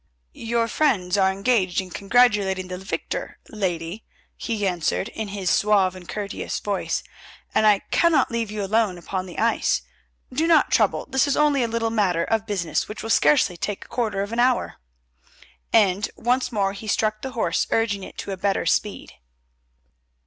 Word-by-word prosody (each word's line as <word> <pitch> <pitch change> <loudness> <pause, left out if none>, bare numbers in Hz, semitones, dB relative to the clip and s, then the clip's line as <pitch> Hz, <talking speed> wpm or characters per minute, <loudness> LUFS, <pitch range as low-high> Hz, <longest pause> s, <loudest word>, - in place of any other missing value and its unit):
"Your 230 0 -1
friends 205 -10 +1
are 190 -1 +3
engaged 195 -2 +1
in 185 -1 -5
congratulating 200 -4 +2
the 180 0 -5
victor, 190 +2 -5
lady," 180 -1 -3 0.3
he 220 -3 -3
answered 180 +3 -1
in 220 -2 -5
his 195 -3 -2
suave 200 -3 +3
and 180 -2 -12
courteous 205 -2 -4
voice, 200 -2 -2 0.5
"and 215 - +4
I 205 -2 +4
cannot 335 -6 +3
leave 230 -2 -2
you 210 -1 -4
alone 205 -2 +1
upon 185 +2 -4
the 175 - -10
ice. - - +1 0.5
Do 315 +5 +1
not 330 -2 +4
trouble; - - +2
this 265 +2 +2
is 285 - +1
only 295 -2 +3
a 235 - +1
little 230 0 -1
matter 185 -7 +1
of 220 +2 -1
business 190 -6 -1
which 210 - -7
will 225 - -2
scarcely 150 0 +3
take 200 +4 -4
a - - -20
quarter 215 -5 -1
of 205 +3 -6
an 235 - -1
hour," 250 0 +1 0.9
and 205 -2 +3
once 250 +3 0
more 200 -3 0
he 200 +2 -9
struck 215 0 0
the 265 -1 -6
horse 180 -8 0
urging 205 -4 0
it - - -11
to - - -5
a 190 - -4
better 195 +1 0
speed. 210 - -1
205 Hz, 175 wpm, -23 LUFS, 190-230 Hz, 0.9 s, and